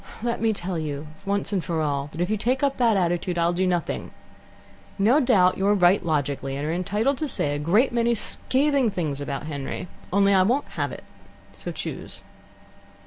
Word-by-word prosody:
"Let 235 -2 -1
me 225 -1 +3
tell 185 -4 -3
you 150 -1 -4 0.2
once 200 +1 0
for 170 -2 -2
all 145 -2 -1
that 160 - -9
if 180 +4 0
you - - +3
take 250 +6 0
up 275 -1 +1
that 230 -5 +3
attitude, 175 0 0
I'll 170 +1 +2
do 185 +2 +1
nothing. 175 -2 -1 0.9
No 225 +9 +4
doubt 195 -10 +3
you're 200 +2 +3
right 185 +1 +4
logically, 145 -4 -1
and 140 +1 -3
are 160 - 0
entitled 210 +10 0
to 310 - -1
say 145 - -1
a 145 - -2
great 205 - +3
many 235 0 +2
scathing 270 +3 +1
things 155 -8 -3
about 140 +1 -4
Henry. 150 +3 -5 0.2
Only, 200 +1 +4
I 190 - +5
won't 245 +10 +1
have - - -3
it. - - -9 0.5
So - - -6
choose. - - -6
185 Hz, 190 wpm, -24 LUFS, 160-230 Hz, 0.9 s, I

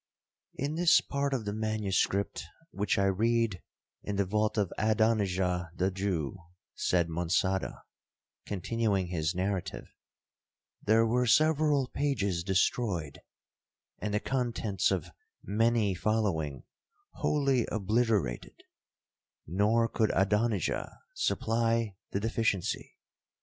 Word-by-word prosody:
'In 145 +3 -2
this 170 +1 +5
part 140 0 -2
of 125 -5 -2
the 100 - -2
manuscript, 105 -3 0 0.3
which 105 +1 0
I 100 - +3
read 110 0 +1 0.4
in 100 - -4
the 100 0 +1
vault 105 +3 0
of 100 -4 0
Adonijah 100 -5 +1
the 95 +1 +1
Jew,' 95 -4 -2 0.3
said 85 -2 +1
Monçada, 90 +3 -1 0.6
continuing 100 -1 -1
his 85 0 -1
narrative, 95 0 -2 1.0
'there 110 +2 +4
were 125 +2 +1
several 150 +1 +3
pages 105 -12 -1
destroyed, 95 - 0 0.8
and 105 - -3
the 105 - +1
contents 115 -6 0
of 95 -5 -2 0.3
many 110 0 +2
following 90 -8 -1 0.5
wholly 135 -5 +1
obliterated—nor 105 - -2
could 110 -2 +1
Adonijah 105 +2 0 0.2
supply 115 - 0
the 100 - -2
deficiency. 110 -3 -1
105 Hz, 100 wpm, -30 LUFS, 95-115 Hz, 1.0 s, this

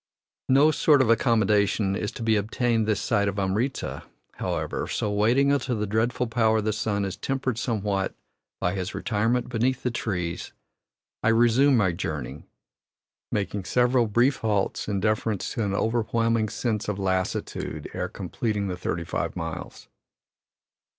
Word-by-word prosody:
No 140 +4 +6
sort 150 -1 +4
of 115 - +3
accommodation 105 -4 +2
is 105 - -2
to - - -6
be 110 -1 +3
obtained 115 +1 0
this 105 -2 +1
side 100 -2 +1
of 100 0 -2
Amritza, 105 +8 -1 0.4
however, - - -2
so, 105 - -1
waiting 120 +7 +3
until 130 -4 0
the 105 - -1
dreadful 115 +4 0
power 110 -1 +2
of 110 - 0
the 110 0 0
sun 105 -3 -1
is 95 -1 -4
tempered 130 +2 -2
somewhat 105 -5 -1 0.4
by 90 - 0
his 95 0 -4
retirement 115 +3 0
beneath 125 +2 0
the 125 - 0
trees, 90 -7 -3 0.7
I - - 0
resume 120 +4 +4
my 95 -5 +3
journey, 70 -4 -5 0.9
making 100 -1 -2
several 125 +3 +3
brief 120 +6 +3
halts 105 -5 -1
in 100 -2 -1
deference 105 -1 0
to 115 - -1
an 100 -1 -1
overwhelming 115 0 +1
sense 110 0 -2
of 105 -2 -2
lassitude 95 -5 -2
ere - - -3
completing 105 -4 -3
the 90 - -3
thirty 85 -1 -2
five - - -3
miles. 80 -1 -6
110 Hz, 150 wpm, -26 LUFS, 100-120 Hz, 0.9 s, No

